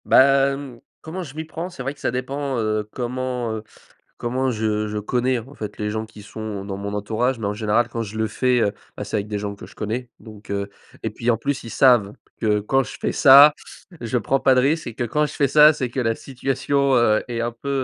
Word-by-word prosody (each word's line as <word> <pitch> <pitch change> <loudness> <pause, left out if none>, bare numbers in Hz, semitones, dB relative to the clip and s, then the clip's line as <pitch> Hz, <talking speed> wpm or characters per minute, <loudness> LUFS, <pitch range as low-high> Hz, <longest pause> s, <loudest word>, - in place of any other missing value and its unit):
Bah 135 +1 +6
hem, 135 -3 -6 0.2
comment 170 +4 -6
je 145 -4 -10
m'y 160 +1 -4
prends? 165 +3 -6
C'est 170 -8 -8
vrai 135 +2 -3
que 145 - -23
ça - - -1
dépend, 135 +2 -3
heu, 110 -1 -1
comment, 125 -1 -3
heu, 110 -1 -5 0.5
comment 130 +2 -1
je 105 -1 -1
je 105 0 -3
connais, 125 +4 0
en 130 +6 -12
fait, 105 -4 -7
les 105 0 -1
gens 110 +1 -3
qui 110 -1 -14
sont 105 -1 -6
dans 100 -1 -5
mon 100 +1 -5
entourage. 115 +5 -1
Mais 105 - -2
en 100 - -1
général, 110 +2 +1
quand 115 -1 -3
je 110 0 -7
le 110 - +1
fais, 125 +4 +1
heu, 100 -2 +1 0.2
bah - - -5
c'est - - -4
avec 100 0 -3
des 105 -1 -3
gens 100 0 -4
que - - -11
je - - -16
connais. 115 +4 -4
Donc 105 -3 -12
heu 100 0 -2 0.3
et - - -2
puis 120 +1 0
en 115 - +1
plus, 140 +4 -2
ils 115 - -8
savent 120 -6 +4 0.3
que 105 -2 +2
quand 135 +6 +1
je - - -9
fais - - 0
ça, 140 +1 +8 0.5
je 120 +1 -1
prends 135 +5 +1
pas 135 - +4
de 130 - +4
risque 155 +5 +1
et 120 - -5
que 120 - -3
quand 150 +6 +1
je - - -6
fais 140 - +2
ça, 150 +2 +7
c'est 130 -4 -3
que 125 - -4
la 115 -2 +1
situation, 135 +3 -1
heu, 115 -3 +3
est 120 -1 -3
un 120 0 -1
peu, 120 +4 -8
120 Hz, 250 wpm, -22 LUFS, 110-135 Hz, 0.5 s, ça